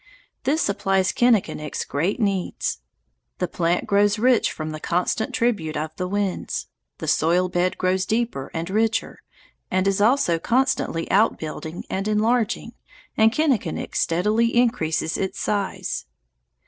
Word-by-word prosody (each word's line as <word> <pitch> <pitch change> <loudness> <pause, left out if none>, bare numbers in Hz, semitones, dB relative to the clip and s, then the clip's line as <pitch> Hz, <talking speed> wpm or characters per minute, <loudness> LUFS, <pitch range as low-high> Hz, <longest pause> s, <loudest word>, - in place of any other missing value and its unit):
This 300 +4 +2
supplies 195 -2 +1
Kinnikinick's 215 -11 +1
great 165 +11 -1
needs. 195 - -1 0.6
The 180 - -1
plant 170 0 0
grows 205 +1 +3
rich 245 +1 +3
from 155 0 -5
the 155 - -6
constant 180 +7 -1
tribute 205 -10 0
of 155 +1 -4
the 180 - -3
winds. 200 -1 -2 0.3
The - - -6
soil 175 +3 +2
bed 180 +1 0
grows 185 0 0
deeper 220 - -1
and 165 +1 -4
richer 225 +2 0 0.5
and 185 +1 +1
is 195 0 +1
also 210 -7 +3
constantly 250 -7 0
outbuilding 165 -5 0
and 195 +2 -2
enlarging, 220 +2 +1 0.4
and 220 0 +5
Kinnikinick 255 - 0
steadily 215 +8 +1
increases 160 -10 +1
its 190 - -3
size. 200 - -2
195 Hz, 130 wpm, -23 LUFS, 170-225 Hz, 0.6 s, and